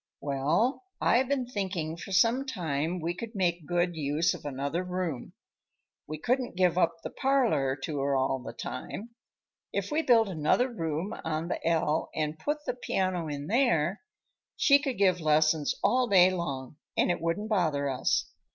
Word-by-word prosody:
"Well, 150 - 0 0.2
I've 250 +2 +3
been 270 -2 0
thinking 190 -9 -3
for 170 +3 -9
some 230 +7 +3
time 165 - -2
we 170 +1 -2
could 230 +5 -8
make 175 -5 0
good 175 0 0
use 150 +2 +1
of - - -10
another 140 +5 -2
room. 180 -7 -4 0.7
We 155 +1 -5
couldn't 245 - -1
give 180 -2 +3
up 170 -2 +1
the - - -5
parlor 230 - +1
to 150 -3 -3
her 140 0 +1
all 135 0 +1
the 120 -2 -7
time. 215 - -6 0.6
If - - -2
we 310 +2 +2
built 230 -7 +4
another 190 - +1
room 165 -4 -3
on 160 +1 -2
the - - -3
ell 160 -2 +1
and 155 0 -2
put 295 - -2
the - - -1
piano 185 -8 -1
in 145 -1 -4
there, 195 - +2 0.6
she 280 -1 +6
could 275 -3 -3
give 185 -3 +3
lessons 155 0 +2
all 255 0 +3
day 185 -3 +6
long 145 -6 -4 0.2
and - - +3
it 175 - -2
wouldn't 170 +6 -1
bother 155 -9 +1
us. 130 -2 0
175 Hz, 170 wpm, -29 LUFS, 150-215 Hz, 0.7 s, she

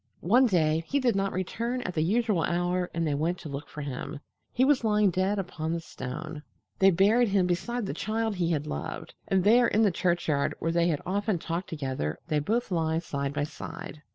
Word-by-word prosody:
One 250 +8 +5
day 160 -5 +2
he 280 - +1
did 245 -5 +2
not 195 0 0
return 235 +7 -2
at 180 - -3
the 155 - 0
usual 210 +1 +2
hour 175 +1 0
and 165 0 -1
they 150 - 0
went 165 +5 0
to 155 - -7
look 140 +1 -6
for 150 - -7
him. 140 +1 -5 0.3
He 255 - +3
was 275 -3 +3
lying 210 -3 +3
dead 190 +4 +1
upon 165 -4 -3
the 170 - -1
stone. 155 +1 -7 0.4
They 195 - +7
buried 205 +7 +4
him 195 -2 +3
beside 225 +7 -1
the - - -3
child 220 -1 -2
he 170 -2 +1
had 150 -3 0
loved, 75 - -5
and 190 -1 +2
there 235 +4 +6
in 220 - +3
the 205 - +4
churchyard 170 -5 0
where 165 - -1
they 170 0 +2
had 155 -4 -1
often 200 +1 0
talked 170 +2 -4
together 130 - -3
they 150 - +2
both 220 +9 -1
lie 160 -2 +1
side 140 -4 -3
by 145 - 0
side. 155 +1 -7
175 Hz, 210 wpm, -28 LUFS, 155-210 Hz, 0.4 s, They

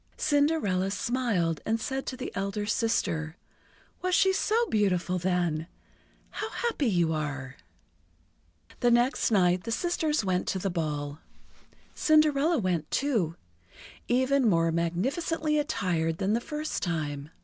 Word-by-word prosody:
Cinderella 285 - +1
smiled 200 -7 0
and 225 +1 0
said 265 +3 -3
to 255 - -4
the 255 - -5
elder 200 +1 -2
sister: 170 -8 -1 0.6
"Was 365 -1 +1
she 380 0 +4
so 445 +4 +2
beautiful 185 - +1
then! 175 -3 0 0.6
How 430 - -4
happy 460 - -1
you 170 -6 +2
are!" 140 -4 -4 1.2
The 245 - +3
next 240 +3 +3
night 180 -4 +3
the 230 - -4
sisters 310 - 0
went 180 -1 0
to - - 0
the 190 0 -2
ball. 150 -3 -3 0.7
Cinderella 310 0 +3
went, 180 - -1
too, 220 - 0 0.7
even 260 0 +3
more 165 -3 +2
magnificently 275 - 0
attired 170 - -1
than 195 +2 0
the 235 - +1
first 300 +4 -4
time. 150 -4 -3
205 Hz, 125 wpm, -28 LUFS, 170-280 Hz, 1.2 s, she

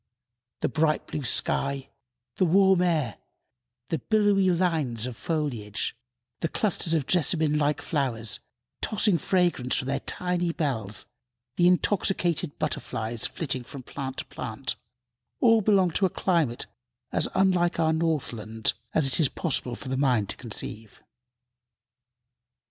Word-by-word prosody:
The - - +2
bright 155 -1 +1
blue 145 - -5
sky, 135 +2 0 0.5
the 185 - +3
warm 190 +1 +5
air, 155 -10 +1 0.7
the 165 - -1
billowy 205 - +3
lines 160 -10 0
of 125 -2 -5
foliage, 125 -11 -2 0.4
the 165 - 0
clusters 170 -2 +1
of 150 -5 0
jessamine 155 -3 +2
like 150 0 0
flowers, 115 - -1 0.4
tossing 210 -4 +2
fragrance 175 -9 +1
from 130 - -1
their 140 0 0
tiny 175 +2 -1
bells, 120 - -2 0.5
the 175 - +4
intoxicated 180 -4 +1
butterflies 115 -7 -2
flitting 130 -5 -3
from 135 +1 -9
plant 135 +1 -6
to - - -3
plant, - - -4 0.6
all 230 -3 +5
belong 195 -4 +3
to 190 +4 +2
a - - -6
climate 165 -11 0 0.5
as - - +3
unlike 180 -3 +2
our 160 -1 +3
northland 120 -9 -1 0.2
as 155 - +4
it 135 -2 +1
is 150 -5 +4
possible 130 -7 -1
for 130 - -8
the 130 - -1
mind 125 -7 +2
to - - -1
conceive. 110 -2 -6
155 Hz, 130 wpm, -26 LUFS, 130-180 Hz, 0.7 s, warm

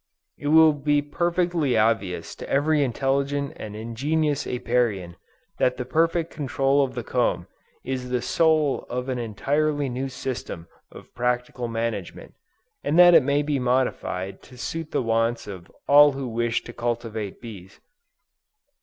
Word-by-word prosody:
It 145 - -5
will 160 0 +6
be 145 0 +1
perfectly 170 -3 0
obvious 100 -6 0
to - - -8
every 145 +1 +2
intelligent 140 +3 -1
and 105 -7 -8
ingenious 140 +7 -1
Apiarian, 115 -8 -1 0.4
that 125 0 +2
the 125 - -4
perfect 165 +4 +1
control 140 -1 +1
of 130 -2 -4
the 120 - -4
comb, - - 0 0.4
is 130 -1 -3
the 125 -1 -1
soul 155 -4 +2
of 125 +2 -3
an 125 -1 -2
entirely 145 +6 -1
new 130 +2 -3
system 125 -10 -6 0.2
of - - -14
practical 125 0 -2
management, 115 -5 -4 0.5
and 150 +3 0
that 175 0 +8
it - - +8
may 140 +2 +1
be 145 -2 -1
modified 120 -8 -1
to 125 - -16
suit 160 +5 -5
the - - -1
wants 115 +1 0
of 95 -4 -9 0.2
all 145 0 +7
who 135 -1 -4
wish 115 0 -1
to 120 - -10
cultivate 115 -4 -4
bees. 100 -4 -11
130 Hz, 145 wpm, -24 LUFS, 115-145 Hz, 0.5 s, that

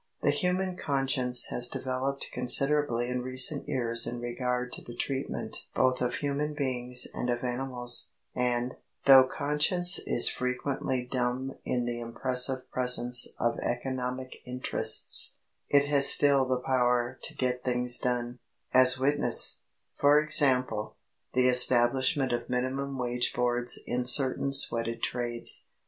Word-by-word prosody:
The - - +2
human 185 0 -2
conscience 135 -3 0
has 120 0 +1
developed 130 +2 -3
considerably 125 -1 +2
in 125 0 -4
recent 130 +3 +2
years 115 -4 0
in 120 - -6
regard 125 +1 -4
to - - -2
the 120 - -12
treatment 135 +2 -5
both 130 -1 0
of 125 - -2
human 145 +1 -4
beings 125 -3 0
and 125 - -5
of 120 0 -3
animals, 125 -1 -2 0.2
and, 125 0 -2 0.3
though 135 -1 +7
conscience 160 +6 +1
is 120 - 0
frequently 125 0 -4
dumb 125 +1 -4
in 125 -1 -2
the 120 0 -4
impressive 125 +2 +2
presence 125 -1 +2
of 120 0 -2
economic 130 +1 -5
interests, 125 0 +4 0.3
it 140 0 +2
has 140 -1 +5
still 140 -2 +4
the 130 -1 -2
power 125 -1 -1
to - - -3
get 125 -1 -3
things 125 -1 +1
done, 125 0 -4 0.3
as 130 0 +6
witness, 145 +2 +1 0.4
for 145 +1 +4
example, 130 -7 +2 0.4
the 130 0 +2
establishment 125 +2 +2
of 120 0 -5
minimum 130 +2 -4
wage 125 -1 -3
boards 120 0 -1
in 125 +1 -3
certain 130 +1 +1
sweated 115 -4 +1
trades. 120 -1 -2
125 Hz, 130 wpm, -27 LUFS, 125-135 Hz, 0.4 s, though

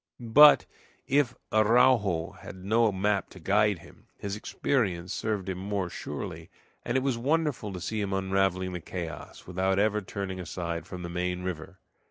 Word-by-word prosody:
But 150 +2 +9 0.4
if 135 -2 +2 0.2
Araujo 110 -6 +4
had - - -9
no 110 +4 +2
map 100 +1 0
to 95 - -13
guide 100 +3 +2
him, - - -18
his 100 0 -4
experience 100 -6 -1
served 105 -4 -2
him 95 -1 -3
more 95 -2 -2
surely, - - -6 0.3
and 120 - 0
it 130 - 0
was 130 -4 0
wonderful 145 -5 0
to 90 - -6
see 105 +4 -3
him 100 -1 -2
unraveling 95 -1 0
the 90 - -5
chaos, 85 0 -7
without 95 +1 0
ever 105 +1 +2
turning 95 -1 -5
aside 85 -1 -4
from 90 -1 -7
the 85 - -5
main 90 +1 -2
river. 90 +1 -5
95 Hz, 165 wpm, -28 LUFS, 90-110 Hz, 0.4 s, But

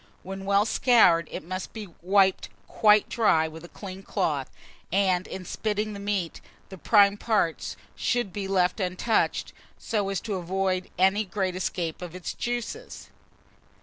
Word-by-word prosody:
When 195 +1 -7
well 200 +1 +3
scoured, 220 -9 +4
it - - -6
must 185 +3 -5
be 215 -2 -7
wiped 190 +1 +3 0.2
quite 210 -1 +4
dry 165 -9 +3
with 160 +1 -10
a 175 - -11
clean 190 -1 -9
cloth; 155 -9 -1 0.4
and, 185 -1 +2
in 185 -1 -7
spitting 210 +3 -2
the 200 - -7
meat, 200 -4 -2 0.3
the 190 - -9
prime 205 0 +5
parts 205 -8 0 0.2
should 240 -6 -1
be 200 -2 -3
left 185 +1 +1
untouched, 185 +4 0 0.2
so 205 -4 -1
as 195 -2 -1
to 210 -4 -3
avoid 185 +1 -1
any 190 +3 +3
great 190 -2 -2
escape 175 -3 -3
of 175 -1 -7
its 185 - -5
juices. 245 - -5
195 Hz, 150 wpm, -26 LUFS, 180-210 Hz, 0.4 s, prime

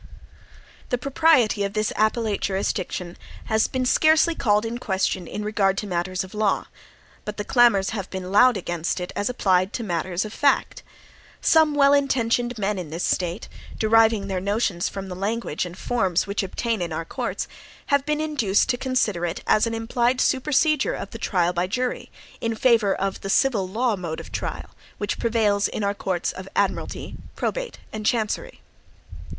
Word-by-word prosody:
The 245 - +1
propriety 270 -6 +3
of 200 0 -2
this 215 0 0
appellate 215 -1 +1
jurisdiction 190 -2 -2 0.3
has 220 0 +2
been 260 -1 -2
scarcely 315 +5 +4
called 210 -7 +1
in 235 +1 -4
question 190 -4 -1
in 210 - -5
regard 195 -2 +1
to 210 - -2
matters 185 0 -2
of 190 - -12
law; 210 -2 +1 0.6
but 210 0 -6
the 205 - -2
clamors 230 -4 +4
have 200 -4 -4
been 185 -1 -6
loud 240 +3 +6
against 175 0 -2
it 180 - -5
as 205 - -1
applied 190 -5 +1
to 235 - -3
matters 180 0 -2
of 215 - -7
fact. 280 -1 +1 0.6
Some 315 -2 +4
well 280 -1 +5
intentioned 245 -3 +1
men 205 -1 -1
in 170 -4 -6
this 165 +3 -4
State, 180 +2 -1 0.3
deriving 220 -1 +4
their 190 -2 -2
notions 200 -3 0
from 195 -1 -6
the 180 - -6
language 200 -3 -2
and 175 +1 -11
forms 190 -7 0
which 200 +1 -2
obtain 220 +2 -2
in 175 -1 -3
our 165 +1 -3
courts, - - -3 0.5
have 280 -1 +4
been 300 +1 -1
induced 280 -11 +1
to 245 - +1
consider 245 -9 0
it 175 +1 -3
as 215 - +3
an 230 - -2
implied 240 +2 0
supersedure 300 - +2
of - - -7
the - - -8
trial 180 -3 +1
by 175 +1 0
jury, 250 +5 -2 0.3
in 230 -1 -1
favor 220 -4 +3
of 195 0 -3
the 195 - -5
civil 210 -4 +2
law 225 +4 0
mode 170 -4 -5
of - - -10
trial, - - -5 0.3
which 205 -1 -3
prevails 215 -3 +2
in 215 - -4
our 200 0 +1
courts 185 -3 -2
of 185 +1 -9
admiralty, - - -1 0.2
probate, - - -3 0.2
and 215 -1 -5
chancery. 235 - -1
210 Hz, 175 wpm, -24 LUFS, 190-245 Hz, 0.6 s, loud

